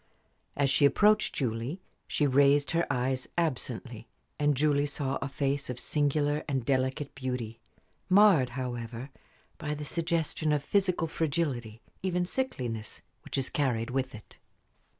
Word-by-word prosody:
As 140 -1 +2
she 145 - +5
approached 210 +8 +4
Julie 125 - -2 0.3
she 150 - +1
raised 140 +1 +4
her 170 +1 +1
eyes 130 +1 0
absently, 125 -7 -2 0.3
and 145 -2 +2
Julie 145 0 +2
saw 140 -1 -2
a 135 - -1
face 140 0 -1
of 125 - -3
singular 145 +1 +1
and 135 -5 -1
delicate 130 +2 0
beauty, 125 -4 -4 0.5
marred, 185 -9 +6
however, 120 0 -5 0.5
by 150 0 -2
the 150 0 -6
suggestion 165 -1 -1
of 145 -1 0
physical 185 -1 +1
fragility, 140 -9 -2 0.2
even 180 -1 0
sickliness, 125 - -3 0.2
which - - -4
is 135 -1 0
carried 125 -5 0
with 130 -1 -1
it. 110 - -14
140 Hz, 135 wpm, -29 LUFS, 125-155 Hz, 0.5 s, marred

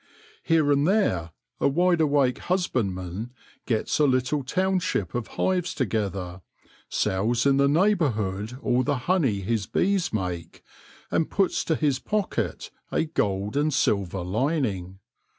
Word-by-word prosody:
Here 160 -3 +2
and 145 +2 +3
there 180 - +1 0.3
a - - +3
wide 175 +4 +2
awake 140 -4 +2
husbandman 110 - -2 0.3
gets 115 +3 0
a 150 - +5
little 130 +2 +1
township 185 - 0
of 120 -2 -3
hives 180 -2 0
together, 100 -7 -2 0.5
sells 115 +6 0
in 135 -1 +4
the 140 0 +4
neigh 180 +9 +4
bourhood 110 - -2
all 125 +1 +2
the 145 +1 0
honey 140 - +2
his 105 +1 -1
bees 190 -2 +1
make, 90 -5 -4 0.5
and 160 - +1
puts 195 -2 +1
to 160 - +1
his 145 -4 +1
pocket 180 - -2 0.2
a - - +1
gold 100 -9 -1
and 150 +2 +2
silver 100 -7 0
lining. 100 - -1
130 Hz, 135 wpm, -25 LUFS, 100-160 Hz, 0.5 s, a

